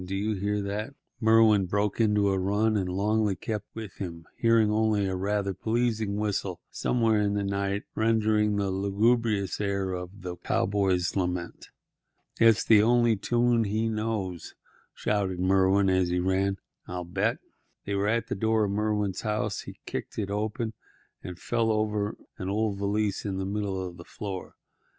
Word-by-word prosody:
do 95 +2 -4
you 105 +3 0
hear 100 +1 -1
that?" 105 +7 -4 0.2
Merwin 110 -4 +5
broke 105 +3 0
into 105 -2 +3
a 95 -1 +1
run, 105 +4 +1
and 95 -3 0
Longley 105 +2 +1
kept 105 +1 -4
with 110 -3 -7
him, 85 -4 -6
hearing 115 -2 +3
only 110 -2 +2
a 95 -1 -1
rather 100 +1 -1
pleasing 110 0 0
whistle 100 -4 -2
somewhere 115 -3 +1
in 100 0 +1
the 100 - 0
night 100 +1 -1
rendering 110 -1 +2
the 100 -1 0
lugubrious 100 +1 +1
air 100 -2 -1
of 90 +2 -6
"The 90 -1 -5
Cowboy's 95 -3 0
Lament." 90 -2 -3 0.7
"It's 115 -2 +5
the 110 -2 +7
only 120 0 +4
tune 120 +2 +2
he 110 +3 0
knows," 105 -6 -3 0.4
shouted 95 -4 -1
Merwin, 95 +1 +3
as 95 -1 +2
he 90 - 0
ran. 95 +2 +1 0.3
"I'll 90 0 -4
bet—" 100 +6 0 0.5
They 100 - -2
were 100 +1 +1
at 115 +2 +1
the - - -3
door 110 +2 +1
of 100 - 0
Merwin's 105 -2 -1
house. 105 -2 -1
He - - -10
kicked - - -5
it 100 -2 -2
open 110 +2 -2 0.5
and 90 -2 -7
fell 115 +3 0
over 105 -1 -1 0.2
an 95 -1 -3
old 105 -1 0
valise 100 0 0
lying 100 -2 -3
in - - -3
the 95 - -2
middle 100 -1 -2
of 90 -2 -6
the 85 - -10
floor. 100 -3 -7
100 Hz, 170 wpm, -27 LUFS, 95-110 Hz, 0.7 s, the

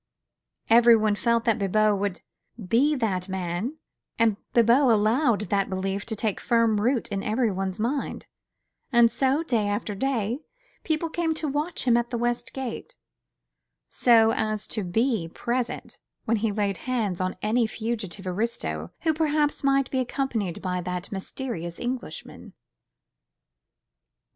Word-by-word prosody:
Everyone 230 -2 +6
felt 230 +3 +1
that 230 -2 +2
Bibot 210 +2 +3
would 200 -2 -2 0.5
be 285 +6 +3
that 195 -7 -1
man, 190 - -3 0.4
and 225 -2 +3 0.2
Bibot 240 +3 +5
allowed 225 +2 +3
that 200 -1 +1
belief 195 +2 -3
to 225 - -3
take 215 -2 -1
firm 230 -3 +2
root 245 +2 +1
in 200 -2 -2
everybody's 200 -4 -1
mind; 260 +6 -2 0.7
and 235 -2 +5
so, 275 +4 +1
day 230 -9 0
after 205 +1 -2
day, 235 +1 -1 0.4
people 315 0 0
came 325 0 -1
to 315 - -3
watch 295 +5 -2
him 245 -2 +4
at 240 0 -1
the 240 - -2
West 240 +1 -1
Gate, 265 - -6 0.9
so 225 -2 +5
as 215 -1 -1
to 215 - -2
be 220 0 0
present 240 +4 -3 0.3
when 230 +1 +2
he 215 0 0
laid 200 -2 -1
hands 210 -8 -1
on 185 0 -2
any 225 +2 +2
fugitive 220 -4 -4
aristo 180 - -2
who 320 -1 +2
perhaps 300 -2 0
might 275 -1 +2
be 260 - 0
accompanied 245 -8 -2
by 180 -1 -1
that 180 +1 -5
mysterious 190 -4 -5
Englishman. 245 -9 -6
225 Hz, 140 wpm, -26 LUFS, 200-255 Hz, 0.9 s, Everyone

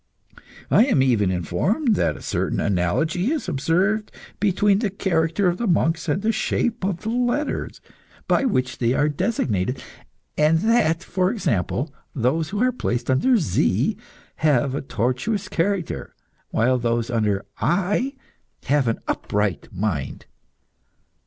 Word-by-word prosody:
I 230 - +6
am 190 - +3
even 115 -7 +2
informed 95 - 0
that - - 0
a - - -12
certain - - -1
analogy 155 - 0
is 315 -9 -2
observed 180 +8 0 0.3
between 200 0 +3
the 215 -3 0
character 180 -1 0
of 175 0 +1
the 235 - -1
monks 165 -2 +1
and 185 +7 0
the 225 - +3
shape 230 0 -1
of 185 -2 -1
the 220 - -3
letter 245 +5 0 0.6
by 275 - +2
which 130 - 0
they 120 0 +2
are 145 +2 +2
designated, 125 - -1 0.5
and 155 +2 +4
that, 185 -7 +2
for 185 -1 0
example, 140 - -1 0.2
those 145 +6 0
who 205 +4 -1
are 255 - +3
placed 120 - -2
under 245 - +3
Z 155 - +1 0.4
have 140 -4 +2
a 140 - -2
tortuous 130 - -1
character, 185 0 -2 0.4
whilst 125 +2 +2
those 115 0 0
under 105 -4 0
I 205 +10 0 0.5
have 140 -2 +2
an 115 - -1
upright 105 +1 -1
mind. 95 -8 -3
160 Hz, 140 wpm, -23 LUFS, 120-205 Hz, 0.6 s, I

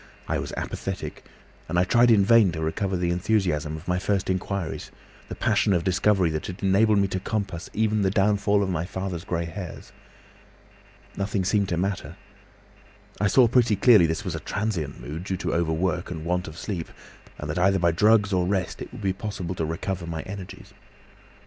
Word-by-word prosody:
I - - 0
was - - -5
apathetic, - - -5 0.4
and 90 - -1
I 90 - +5
tried 120 +6 +4
in 105 -4 +5
vain 115 -4 +6
to 80 - -4
recover 95 +4 -1
the 90 -1 0
enthusiasm 85 -5 0
of 80 - -12
my 90 0 +1
first 95 0 0
inquiries, 95 -2 -3 0.4
the - - -5
passion 100 - +2
of 85 -2 +1
discovery 95 -1 +2
that 75 0 -3
had 90 +2 -8
enabled 105 +3 +4
me 100 0 +3
to 95 - -2
compass 100 -4 -3
even 110 -1 +1
the 95 - +2
downfall 100 0 +2
of 95 - -2
my 85 -2 -1
father's 90 -1 -4
grey 85 -1 -2
hairs. 85 +2 -8 1.2
Nothing 100 -1 -1
seemed 100 0 +1
to 85 - -1
matter. 95 +2 -2 1.0
I 105 - +2
saw 125 +3 +5
pretty 115 -2 +3
clearly 100 -4 +6
this 80 0 -3
was - - -2
a - - -3
transient 95 -9 -3
mood, 80 +4 -6
due 95 -2 -2
to - - -2
overwork 85 +2 0
and 80 -2 -6
want 90 +1 -1
of 80 +1 -9
sleep, 90 -5 -4 0.5
and 75 - -6
that 75 +4 -2
either 95 +2 +4
by 85 -2 +3
drugs 105 +3 +3
or 90 -1 +2
rest 95 -3 -1
it - - -7
would - - -9
be 95 -1 +1
possible 95 -3 -4
to 80 -3 -2
recover 85 +2 -3
my 80 -1 -4
energies. 95 -1 -9
95 Hz, 195 wpm, -25 LUFS, 85-100 Hz, 1.2 s, vain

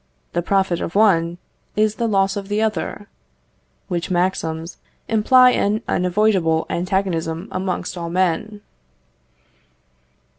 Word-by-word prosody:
The 175 - 0
profit 190 -1 0
of 165 - -5
one, 175 -5 +3 0.4
is 215 0 +1
the 235 - 0
loss 195 -2 +1
of 200 -1 -5
the 205 +1 -1
other: 215 -1 -2 0.8
which 175 0 -3
maxims 175 -2 -1 0.3
imply 250 +3 +5
an 215 0 0
unavoidable 180 -3 +1
antagonism 175 -2 -1
amongst 185 -1 -3
all 170 -1 -5
men. 185 +4 -1
190 Hz, 110 wpm, -20 LUFS, 170-210 Hz, 0.8 s, imply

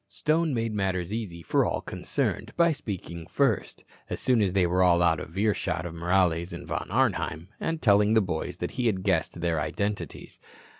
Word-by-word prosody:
Stone 155 -2 +1
made 115 -1 -1
matters 95 -2 -1
easy 95 -7 -5
for - - +2
all - - 0
concerned - - -3
by 170 -1 +5
speaking 90 - -6
first, - - 0 0.3
as - - -3
soon 125 -3 +3
as 95 -3 +1
they 95 -2 +3
all 85 - -1
were 90 +1 +3
out 85 -3 +4
of 80 +4 -9
earshot 100 -5 0
of 85 - -5
Morales 85 0 +1
and - - -7
Von - - -4
Arnheim, 80 +4 0
and 165 -1 -2
telling 105 -1 +5
the - - +7
boys 90 -6 -3
he 125 -1 -1
had 95 -4 0
guessed 85 -2 0
their 85 -2 +1
identities. 100 +6 -4
95 Hz, 185 wpm, -27 LUFS, 85-110 Hz, 0.3 s, the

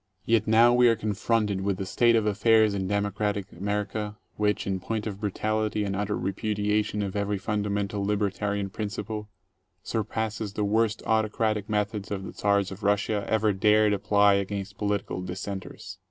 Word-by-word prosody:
Yet 115 -1 +2
now 115 +2 +6
we 125 0 +5
are 115 - +5
confronted 105 -1 0
with 100 -1 -1
a 95 - -2
state 115 +5 +3
of 110 -2 +2
affairs 110 +1 +4
in 95 -2 -2
democratic 100 0 -1
America 105 +2 -3 0.2
which, 105 -1 0
in 95 -1 -1
point 110 +3 -3
of 100 -2 -5
brutality 110 +1 -1
and 100 -1 -2
utter 105 +1 -1
repudiation 105 +1 -1
of 100 -1 -4
every 100 0 0
fundamental 100 0 -2
libertarian 100 -1 -1
principle* 105 +1 -5 0.5
surpasses 110 -1 -3
the 105 - -1
worst 110 +2 +1
autocratic 110 -1 0
methods 105 -1 -1
the 95 -2 -5
Czars 100 -1 +1
of 95 +2 -8
Russia 100 0 0
ever 110 -1 +2
dared 105 +2 +4
apply 100 0 +4
against 100 0 -3
political 100 -3 -1
dissenters. 95 +1 -6
105 Hz, 155 wpm, -27 LUFS, 100-110 Hz, 0.5 s, now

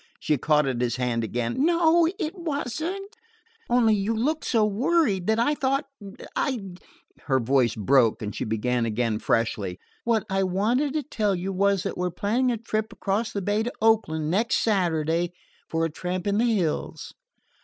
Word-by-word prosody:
She 155 - +1
caught 150 +2 +2
at 130 -3 -1
his 120 -1 0
hand 125 -2 -1
again. 120 - -1
"No, 335 0 +4
it 325 -4 -3
wasn't; 340 - -4 0.5
only 240 -2 +4
you 210 +2 0
looked 300 +8 -1
so 225 -3 +3
worried 215 - +1
that 220 0 +3
I 240 +6 +2
thought 275 0 0 0.5
I 260 -4 0 0.4
" - - -35
Her 135 -2 +3
voice 125 -1 +2
broke, 115 +1 +3
and 105 - -4
she - - -3
began 115 +2 0
again 115 -1 -1
freshly. 105 -6 -1 0.3
"What 230 -3 +1
I 195 0 0
wanted 220 +10 +1
to 305 -1 -1
tell 210 -7 0
you 185 +2 -3
was 200 0 +2
that - - -4
we're 180 0 0
planning 230 +8 0
a 235 - -1
trip 220 -1 -3
across 215 +3 -2
the 200 -3 -3
bay 205 +3 +1
to 240 +2 -2
Oakland, 165 -9 +2
next 220 +6 +1
Saturday, 170 -4 +1 0.4
for 165 0 0
a 165 - -3
tramp 180 +3 -4
in 205 +1 +1
the 235 0 +3
hills." 180 -8 -2
200 Hz, 175 wpm, -25 LUFS, 150-240 Hz, 0.5 s, No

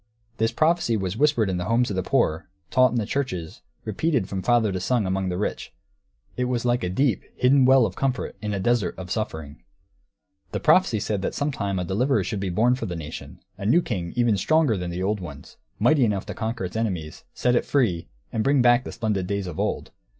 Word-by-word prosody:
This 115 0 +1
prophecy 160 -7 +2
was 95 -1 -3
whispered 135 -4 +2
in 95 -2 -1
the 90 - -3
homes 115 +2 +1
of - - -2
the 95 - 0
poor, 80 -2 0 0.2
taught 130 0 +5
in 120 - -4
the 110 - 0
churches, 95 - -3 0.2
repeated 115 - 0
from 95 -1 -4
father 110 +1 +2
to 95 - -2
son 110 +3 0
among 95 0 -1
the 90 - -2
rich; 105 - -4 0.6
it 125 - -1
was 125 -1 -1
like 120 0 +1
a 90 - -1
deep, 120 +3 +1
hidden 130 +1 +4
well 130 -2 +6
of - - -4
comfort 130 -2 -2
in 105 -1 -3
a 100 - -2
desert 115 -2 +1
of 90 -1 -7
suffering. 80 - -4 0.9
The - - -1
prophecy 125 - +4
said 105 -2 -2
that - - -3
some 145 +1 0
time 100 -7 -2
a 90 - -1
deliverer 125 +10 +1
should 105 - -3
be 95 -1 -2
born 115 +8 +3
for 125 - -3
the 90 - -4
nation, 80 -1 -8 0.2
a 100 - -5
new 170 +10 +4
king 90 -7 -3
even 120 -4 +2
stronger 155 - +2
than 90 -2 -4
the 90 +2 -3
old 105 +2 0
ones, 75 -6 -10 0.2
mighty 130 +6 +4
enough 105 -4 0
to - - -5
conquer 110 -3 -3
its 90 - -7
enemies, 90 -9 -3
set 125 - +1
it - - +2
free, 90 - 0 0.3
and 110 - 0
bring 135 0 +3
back 120 0 +5
the - - -5
splendid 105 -6 -2
days 100 0 -2
of 90 -3 -6
old. - - -2
110 Hz, 225 wpm, -24 LUFS, 95-125 Hz, 0.9 s, well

